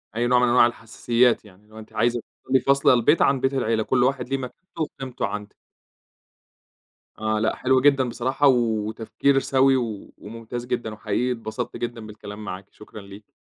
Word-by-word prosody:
أي 120 Hz, +1 st, 0 dB
نوع 125 Hz, 0 st, +4 dB
من 125 Hz, -, +3 dB
أنواع 120 Hz, 0 st, +5 dB
الحساسيات 120 Hz, +1 st, 0 dB
يعني، 100 Hz, 0 st, -18 dB
اللي 105 Hz, +1 st, -24 dB
هو -, -, -9 dB
أنتِ 110 Hz, -, -13 dB
عايزة 120 Hz, 0 st, +1 dB, 0.2 s
تفضلي 130 Hz, 0 st, +3 dB
فاصلة 140 Hz, -1 st, +4 dB
البيت 125 Hz, +6 st, +3 dB
عن 135 Hz, -1 st, +3 dB
بيت 135 Hz, +1 st, 0 dB
العيلة، 115 Hz, -4 st, 0 dB
كل 125 Hz, +2 st, +1 dB
واحد 130 Hz, 0 st, 0 dB
له 135 Hz, -, 0 dB
مكانته 135 Hz, +7 st, -9 dB
وقيمته 135 Hz, -7 st, -4 dB
عندِك. 105 Hz, +1 st, -6 dB, 1.6 s
آه، 110 Hz, 0 st, 0 dB
لأ، 110 Hz, +1 st, 0 dB
حلو 130 Hz, 0 st, +2 dB
جدًا 135 Hz, -2 st, +3 dB
بصراحة 130 Hz, +4 st, +1 dB
وتفكير 115 Hz, +2 st, +1 dB
سوي 135 Hz, 0 st, +3 dB
و 115 Hz, -5 st, -5 dB
وممتاز 115 Hz, +3 st, -7 dB
جدًا، 120 Hz, -3 st, -3 dB
وحقيقي 110 Hz, +4 st, -1 dB
اتبسطت 120 Hz, +1 st, -5 dB
جدًا 115 Hz, -2 st, -5 dB
بالكلام 105 Hz, 0 st, -9 dB
معاكِ، 95 Hz, +1 st, -6 dB
شكرًا 105 Hz, 0 st, -12 dB
ليكِ. 100 Hz, +1 st, -14 dB
120 Hz, 175 wpm, -23 LUFS, 110-130 Hz, 1.6 s, أنواع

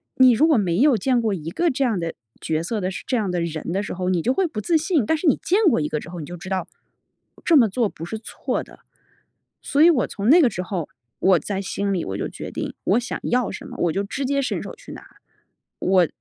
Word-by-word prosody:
你 260 Hz, -1 st, +7 dB
如 270 Hz, +8 st, +4 dB
果 310 Hz, -5 st, +4 dB
没 180 Hz, -4 st, +1 dB
有 275 Hz, -2 st, +5 dB
见 250 Hz, 0 st, +1 dB
过 220 Hz, -2 st, 0 dB
一 165 Hz, -2 st, -5 dB
个 340 Hz, -, +1 dB
这 275 Hz, -1 st, 0 dB
样 225 Hz, -8 st, +1 dB
的 165 Hz, -1 st, -4 dB, 0.3 s
角 160 Hz, 0 st, -1 dB
色 210 Hz, +4 st, -2 dB
的 185 Hz, -, -1 dB
时 190 Hz, -, -6 dB
这 255 Hz, -, -1 dB
样 210 Hz, -4 st, -1 dB
的 180 Hz, -1 st, -1 dB
人 165 Hz, 0 st, -4 dB
的 195 Hz, +3 st, -1 dB
时 -, -, -5 dB
候， 180 Hz, 0 st, -2 dB
你 180 Hz, -, +2 dB
就 255 Hz, -, +1 dB
会 380 Hz, +3 st, +1 dB
不 225 Hz, -9 st, -5 dB
自 320 Hz, +9 st, +2 dB
信。 310 Hz, -, +1 dB
但 320 Hz, -, +2 dB
是 320 Hz, +2 st, -2 dB
你 -, -, +5 dB
见 385 Hz, +5 st, +2 dB
过 230 Hz, -, +2 dB
一 150 Hz, -, -1 dB
个 150 Hz, -, -2 dB
之 170 Hz, -, -10 dB
后， 175 Hz, -, -7 dB
你 155 Hz, -, -6 dB
就 175 Hz, -, -8 dB
知 185 Hz, +2 st, -9 dB
道， 190 Hz, -1 st, -2 dB, 0.8 s
这 335 Hz, -, +5 dB
么 235 Hz, -6 st, +6 dB
做 230 Hz, +2 st, +1 dB
不 165 Hz, -, -10 dB
是 220 Hz, -, -5 dB
错 220 Hz, -, -4 dB
的。 -, -, -17 dB, 0.8 s
所 280 Hz, -, -1 dB
以 335 Hz, -, +8 dB
我 260 Hz, -8 st, +1 dB
从 205 Hz, +1 st, -4 dB
那 340 Hz, +5 st, +8 dB
个 255 Hz, -, +5 dB
时 180 Hz, -, -4 dB
候， 180 Hz, -4 st, -4 dB, 0.3 s
我 185 Hz, -2 st, +4 dB
在 195 Hz, +6 st, -3 dB
心 200 Hz, +1 st, -2 dB
里 175 Hz, -, -1 dB
我 95 Hz, 0 st, -4 dB
就 -, -, -2 dB
决 -, -, -8 dB
定 -, -, -4 dB
我 210 Hz, +6 st, +3 dB
想 240 Hz, -, -5 dB
要 250 Hz, -1 st, 0 dB
什 -, -, -8 dB
么， -, -, -9 dB
我 170 Hz, -, +2 dB
就 195 Hz, +5 st, -1 dB
直 270 Hz, +7 st, -4 dB
接 280 Hz, +1 st, +1 dB
伸 265 Hz, -, -2 dB
手 -, -, -7 dB
去 -, -, -13 dB
拿。 -, -, -11 dB, 0.7 s
我 185 Hz, -3 st, +3 dB
210 Hz, 295 characters per minute, -22 LUFS, 180-265 Hz, 0.8 s, 以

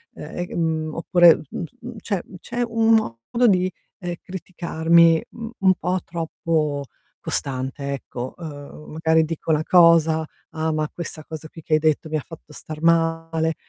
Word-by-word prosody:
Ehm, 150 Hz, -, -9 dB
e 175 Hz, 0 st, -4 dB
mhmm, 160 Hz, -2 st, -1 dB
oppure, 175 Hz, 0 st, +6 dB
mhmm, -, -, -5 dB, 0.2 s
mhmm, 245 Hz, 0 st, -8 dB
c'è 200 Hz, -3 st, -2 dB, 0.2 s
c'è 240 Hz, +1 st, -4 dB
un 225 Hz, -1 st, +3 dB
modo 215 Hz, -, +1 dB
di, 185 Hz, -2 st, +3 dB, 0.3 s
ehm, 175 Hz, -2 st, -4 dB
criticarmi, 170 Hz, -2 st, +2 dB
uhm, 230 Hz, 0 st, -7 dB
un 190 Hz, -1 st, +5 dB
po' 180 Hz, +1 st, -1 dB
troppo 160 Hz, -3 st, -2 dB, 0.3 s
costante, 135 Hz, +1 st, -2 dB
ecco. 130 Hz, -2 st, -5 dB
Ehm, 150 Hz, -2 st, -9 dB
magari 160 Hz, 0 st, +3 dB
dico 160 Hz, 0 st, -3 dB
una 155 Hz, 0 st, +2 dB
cosa: 165 Hz, -2 st, +5 dB, 0.3 s
"Ah, 160 Hz, 0 st, -1 dB
ma 155 Hz, -1 st, 0 dB
questa 170 Hz, -2 st, -7 dB
cosa 155 Hz, -1 st, -8 dB
qui 165 Hz, -, -12 dB
che 155 Hz, -, -3 dB
hai 155 Hz, -, +5 dB
detto 155 Hz, 0 st, +1 dB
mi 155 Hz, -, 0 dB
fatto 155 Hz, 0 st, -12 dB
star 155 Hz, +1 st, -8 dB
male". 165 Hz, -1 st, +1 dB
165 Hz, 160 wpm, -23 LUFS, 155-175 Hz, 0.3 s, oppure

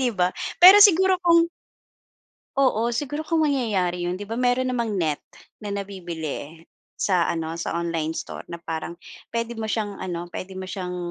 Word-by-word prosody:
'di 250 Hz, -2 st, +2 dB
ba? 180 Hz, 0 st, +2 dB, 0.3 s
Pero 375 Hz, +4 st, +10 dB
siguro 380 Hz, -1 st, +6 dB
kung 335 Hz, -1 st, +5 dB, 1.1 s
Oo. 240 Hz, -3 st, +2 dB
Siguro 295 Hz, +5 st, -3 dB
kung 325 Hz, 0 st, +1 dB
mangyayari 190 Hz, -10 st, 0 dB
'yon 175 Hz, +1 st, -2 dB
'di 205 Hz, -, -7 dB
ba 225 Hz, -, -3 dB
meron 250 Hz, +1 st, +1 dB
namang 235 Hz, -3 st, -1 dB
net 160 Hz, -6 st, -1 dB, 0.4 s
na 205 Hz, -1 st, -5 dB
nabibili 170 Hz, -6 st, -6 dB, 0.3 s
sa 180 Hz, -4 st, +1 dB
ano, 165 Hz, 0 st, -3 dB
sa -, -, -3 dB
online 165 Hz, -2 st, -2 dB
store -, -, -6 dB
na 170 Hz, 0 st, -8 dB
parang 165 Hz, +1 st, -4 dB, 0.4 s
pwede 230 Hz, 0 st, -2 dB
mo 225 Hz, -, -4 dB
siyang 215 Hz, -2 st, -2 dB
ano, 175 Hz, -2 st, -5 dB
pwede 185 Hz, +2 st, -7 dB
mo 185 Hz, 0 st, -6 dB
siyang 180 Hz, -2 st, -5 dB
200 Hz, 165 wpm, -24 LUFS, 175-250 Hz, 1.1 s, Pero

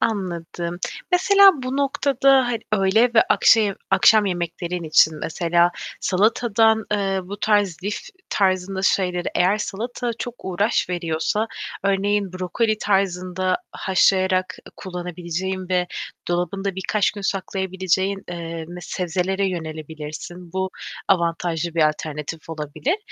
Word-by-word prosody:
Anladım. 175 Hz, -4 st, -3 dB, 0.3 s
Mesela 395 Hz, +2 st, +7 dB
bu 255 Hz, +2 st, -3 dB
noktada 275 Hz, -2 st, +3 dB
ha -, -, 0 dB, 0.2 s
öğle 215 Hz, +4 st, +3 dB
ve 225 Hz, -, +7 dB
akşe 210 Hz, -4 st, +4 dB, 0.2 s
akşam 215 Hz, -2 st, +5 dB
yemeklerin 175 Hz, 0 st, -3 dB
için 155 Hz, 0 st, +4 dB
mesela 170 Hz, +1 st, +2 dB, 0.3 s
salatadan, 220 Hz, +2 st, +2 dB
eee, 195 Hz, -2 st, 0 dB
bu 205 Hz, +2 st, -8 dB
tarz 205 Hz, -5 st, +2 dB
lif 205 Hz, +1 st, -1 dB, 0.3 s
tarzında 190 Hz, -1 st, 0 dB
şeyleri 180 Hz, -2 st, +1 dB
eğer 190 Hz, +4 st, +3 dB
salata 235 Hz, +4 st, -3 dB
çok 245 Hz, -1 st, -5 dB
uğraş 200 Hz, +4 st, +1 dB
veriyorsa, 175 Hz, +5 st, -1 dB, 0.4 s
örneğin 200 Hz, 0 st, +1 dB
brokoli 210 Hz, +4 st, -1 dB
tarzında 185 Hz, -2 st, 0 dB, 0.2 s
haşlayarak 185 Hz, -1 st, +2 dB
ı -, -, -13 dB
kullanabileceğin 180 Hz, +1 st, -5 dB
ve 180 Hz, -1 st, +1 dB, 0.4 s
dolabında 180 Hz, +3 st, -1 dB
birkaç 195 Hz, +2 st, +1 dB
gün 205 Hz, -, -9 dB
saklayabileceğin, 190 Hz, 0 st, -1 dB
eee, 165 Hz, -2 st, -5 dB
me 175 Hz, 0 st, -8 dB
sebzelere 185 Hz, +3 st, -1 dB
yönelebilirsin. 160 Hz, +1 st, -7 dB
Bu, 190 Hz, 0 st, -1 dB, 0.4 s
avantajlı 170 Hz, -2 st, 0 dB
bir 165 Hz, -, +3 dB
alternatif 150 Hz, +1 st, -6 dB
olabilir 160 Hz, -, -2 dB
190 Hz, 115 wpm, -22 LUFS, 175-205 Hz, 0.4 s, Mesela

